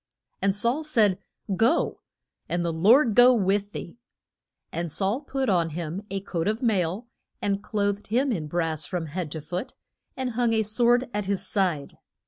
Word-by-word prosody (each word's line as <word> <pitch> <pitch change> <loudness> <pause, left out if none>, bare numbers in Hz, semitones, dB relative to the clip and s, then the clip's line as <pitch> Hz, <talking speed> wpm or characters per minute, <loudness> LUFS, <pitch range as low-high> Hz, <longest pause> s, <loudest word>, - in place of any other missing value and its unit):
And 195 0 +2
Saul 235 +9 0
said, 215 -11 +2 0.4
Go, 230 - +2 0.5
and 175 0 0
the 170 - -1
Lord 225 - +5
go 245 +2 +7
with 200 -1 +1
thee. 185 +4 -8 0.7
And 170 -1 -3
Saul 195 - 0
put 270 -2 -2
on 175 -5 +2
him 170 +2 -4
a 195 0 -3
coat 175 -3 -3
of 215 +4 -1
mail, 200 0 0 0.3
and 200 0 -1
clothed 205 -1 -1
him 255 +5 +1
in 160 -9 -2
brass 160 -1 -1
from 170 +2 -3
head 160 0 -4
to 160 - -5
foot, 175 - -5 0.4
and 260 -1 -2
hung 235 0 +1
a 220 -1 +2
sword 240 +4 +2
at 205 -2 -2
his 200 0 -1
side. 180 -7 -1
200 Hz, 170 wpm, -26 LUFS, 175-235 Hz, 0.7 s, go